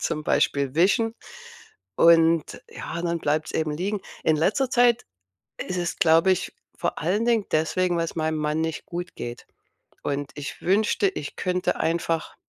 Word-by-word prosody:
zum 155 Hz, 0 st, -2 dB
Beispiel 140 Hz, -1 st, +1 dB
wischen. 205 Hz, +7 st, +3 dB, 0.8 s
Und 165 Hz, -1 st, +4 dB
ja, 170 Hz, -, -6 dB
dann 170 Hz, -1 st, -1 dB
bleibt's 150 Hz, +1 st, -1 dB
eben 155 Hz, -1 st, -1 dB
liegen. 195 Hz, +6 st, -2 dB, 0.2 s
In 155 Hz, -1 st, +3 dB
letzter 230 Hz, -, +1 dB
Zeit 240 Hz, -2 st, +3 dB, 0.5 s
ist 185 Hz, -, -4 dB
es, 175 Hz, -1 st, -3 dB
glaube 165 Hz, +1 st, +5 dB
ich, 185 Hz, -, -2 dB, 0.2 s
vor -, -, -2 dB
allen 195 Hz, +8 st, 0 dB
Dingen 230 Hz, -4 st, +2 dB
deswegen, 175 Hz, +3 st, +1 dB
weil 165 Hz, -, 0 dB
's -, -, -10 dB
meinem 160 Hz, 0 st, 0 dB
Mann 150 Hz, +1 st, -1 dB
nicht 160 Hz, -1 st, -4 dB
gut 175 Hz, +1 st, -6 dB
geht. 120 Hz, 0 st, -7 dB, 0.6 s
Und 140 Hz, 0 st, -3 dB
ich 145 Hz, -2 st, -7 dB
wünschte, 200 Hz, +1 st, +2 dB
ich 145 Hz, -, -7 dB
könnte 180 Hz, 0 st, -1 dB
einfach, 165 Hz, -1 st, -1 dB
170 Hz, 160 wpm, -25 LUFS, 155-190 Hz, 0.8 s, glaube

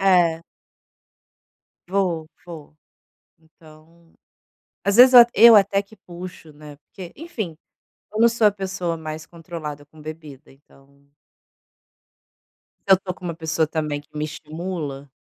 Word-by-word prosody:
É. 175 Hz, -4 st, +3 dB, 1.5 s
Vou, 175 Hz, -5 st, -1 dB, 0.2 s
vou. 155 Hz, -3 st, -11 dB, 0.6 s
Então, 160 Hz, +1 st, -21 dB, 0.7 s
às 200 Hz, +2 st, +1 dB
vezes 255 Hz, +1 st, +8 dB
eu 245 Hz, -1 st, +11 dB
eu 230 Hz, +2 st, +8 dB
até 200 Hz, -1 st, +3 dB
que 205 Hz, +2 st, -19 dB
puxo, 175 Hz, -4 st, -11 dB
né, 150 Hz, 0 st, -13 dB
porque, 175 Hz, +4 st, -12 dB
enfim, 225 Hz, -, -6 dB, 0.5 s
eu 215 Hz, -, -4 dB
não 235 Hz, +1 st, +6 dB
sou 230 Hz, -2 st, +3 dB
a 205 Hz, -, +3 dB
pessoa 190 Hz, -4 st, -4 dB
mais 155 Hz, 0 st, -7 dB
controlada 160 Hz, -4 st, -9 dB
com 155 Hz, +1 st, -18 dB
bebida, 155 Hz, -3 st, -11 dB
então. 140 Hz, 0 st, -25 dB, 1.8 s
Se -, -, -3 dB
eu -, -, +10 dB
estou 185 Hz, -1 st, -7 dB
com 185 Hz, -, -16 dB
uma 170 Hz, -2 st, -4 dB
pessoa 160 Hz, -1 st, -1 dB
também 150 Hz, -2 st, -3 dB
que 145 Hz, -, -26 dB
me 150 Hz, -, -2 dB
estimula. 155 Hz, -2 st, -6 dB
165 Hz, 135 wpm, -22 LUFS, 155-190 Hz, 1.8 s, eu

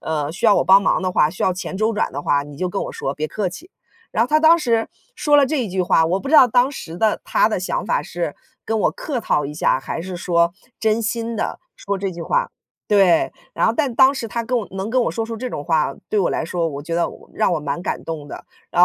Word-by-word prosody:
呃， 150 Hz, -2 st, -2 dB
需 195 Hz, +8 st, -7 dB
要 210 Hz, -2 st, +6 dB
我 -, -, +3 dB
帮 195 Hz, +1 st, +7 dB
忙 185 Hz, -, +2 dB
的 185 Hz, -1 st, -1 dB
话， 150 Hz, -3 st, +3 dB
需 180 Hz, -, -6 dB
要 185 Hz, -, +3 dB
钱 185 Hz, -, -6 dB
周 220 Hz, +2 st, +1 dB
转 210 Hz, -, -1 dB
的 140 Hz, -, -4 dB
话， 145 Hz, -1 st, +1 dB
你 145 Hz, -1 st, -11 dB
就 185 Hz, -, -1 dB
跟 195 Hz, +2 st, -3 dB
我 -, -, -5 dB
说， 135 Hz, -, -3 dB
别 155 Hz, +1 st, -3 dB
客 200 Hz, +2 st, -2 dB
气。” 325 Hz, -, -11 dB, 0.4 s
然 225 Hz, -, +2 dB
后 245 Hz, -, -1 dB
他 305 Hz, -, +4 dB
当 325 Hz, +2 st, +6 dB
时 230 Hz, -7 st, 0 dB, 0.3 s
说 295 Hz, -1 st, +3 dB
了 285 Hz, -1 st, +5 dB
这 290 Hz, 0 st, -1 dB
一 -, -, -5 dB
句 185 Hz, 0 st, -2 dB
话， 165 Hz, -2 st, +3 dB
我 185 Hz, +3 st, 0 dB
不 275 Hz, -, -6 dB
知 315 Hz, -, +1 dB
道 260 Hz, -, +9 dB
当 250 Hz, +3 st, +3 dB
时 170 Hz, -, -8 dB
的 215 Hz, +3 st, +1 dB
他 -, -, +3 dB
的 215 Hz, -, -1 dB
想 185 Hz, -, -2 dB
法 -, -, +1 dB
是 170 Hz, -4 st, -4 dB, 0.3 s
跟 225 Hz, 0 st, -1 dB
我 -, -, +2 dB
客 285 Hz, -5 st, -4 dB
套 150 Hz, -9 st, 0 dB
一 145 Hz, -, -5 dB
下， 150 Hz, -3 st, +1 dB
还 165 Hz, -, -5 dB
是 180 Hz, +1 st, -6 dB
说 170 Hz, -1 st, +1 dB, 0.3 s
真 220 Hz, +1 st, +1 dB
心 230 Hz, +1 st, -2 dB
地 -, -, -3 dB, 0.2 s
说 200 Hz, -1 st, -3 dB
这 195 Hz, -1 st, -3 dB
句 170 Hz, -, -7 dB
话。 -, -, 0 dB, 0.4 s
对， 195 Hz, -5 st, +4 dB, 0.2 s
然 -, -, +2 dB
后 225 Hz, -, +3 dB
但 280 Hz, -5 st, +1 dB
当 265 Hz, +1 st, +6 dB
时 235 Hz, -5 st, -4 dB
他 235 Hz, +1 st, -3 dB
跟 250 Hz, +1 st, 0 dB
我 220 Hz, -, -3 dB
能 190 Hz, +2 st, -4 dB
跟 250 Hz, +2 st, +2 dB
我 -, -, 0 dB
说 225 Hz, -1 st, -3 dB
出 230 Hz, -, -5 dB
这 250 Hz, +2 st, -5 dB
种 145 Hz, -, -5 dB
话， 155 Hz, -4 st, +1 dB
对 210 Hz, -, +1 dB
我 -, -, +1 dB
来 -, -, -1 dB
说， 170 Hz, 0 st, -1 dB
我 140 Hz, -2 st, -6 dB
觉 165 Hz, +3 st, -5 dB
得 170 Hz, -, +1 dB
我 -, -, -15 dB
让 -, -, +1 dB
我 170 Hz, -, +1 dB
蛮 160 Hz, +3 st, -4 dB
感 -, -, -3 dB
动 155 Hz, -3 st, -6 dB
的， -, -, -9 dB, 0.3 s
然 -, -, +1 dB
195 Hz, 300 characters per minute, -20 LUFS, 170-230 Hz, 0.4 s, 道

